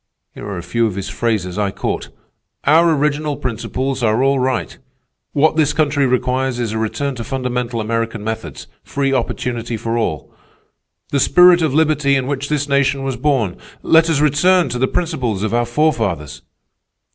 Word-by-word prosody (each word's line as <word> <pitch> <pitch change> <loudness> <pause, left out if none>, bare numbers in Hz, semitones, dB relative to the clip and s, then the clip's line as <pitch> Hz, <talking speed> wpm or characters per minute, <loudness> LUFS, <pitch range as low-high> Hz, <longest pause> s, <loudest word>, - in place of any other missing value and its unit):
Here - - -9
are 100 -2 -5
a 85 - -6
few 115 +3 0
of 100 - -5
his 100 0 -4
phrases 100 -2 -2
I 100 -1 +1
caught: - - -4 0.5
'Our 160 +2 +4
original 150 0 -1
principles 130 +2 -3
are 110 +2 +2
all 135 0 +2
right,' 130 0 -1 0.6
'What 155 +2 +2
this 150 -2 +3
country 145 -3 +1
requires 125 0 0
is 120 -3 -2
a 110 - -2
return 140 +6 -2
to 115 - -4
fundamental 125 -2 -3
American 115 0 -2
methods—free 110 - -4
opportunity 120 -2 -2
for 115 +2 -2
all,' 80 -10 -3 0.8
'The 140 - +1
spirit 180 +3 +6
of 155 -4 0
liberty 150 -3 +2
in 130 -1 0
which 140 0 -3
this 150 -1 -1
nation 140 -1 +1
was 135 -1 -2
born,' 120 -7 0 0.3
'Let 165 0 +4
us 150 -3 +1
return 155 +3 +3
to 125 0 -3
the 130 - +2
principles 130 - -2
of 110 - -2
our 120 0 +1
forefathers. 105 - -1
130 Hz, 170 wpm, -18 LUFS, 115-145 Hz, 0.8 s, spirit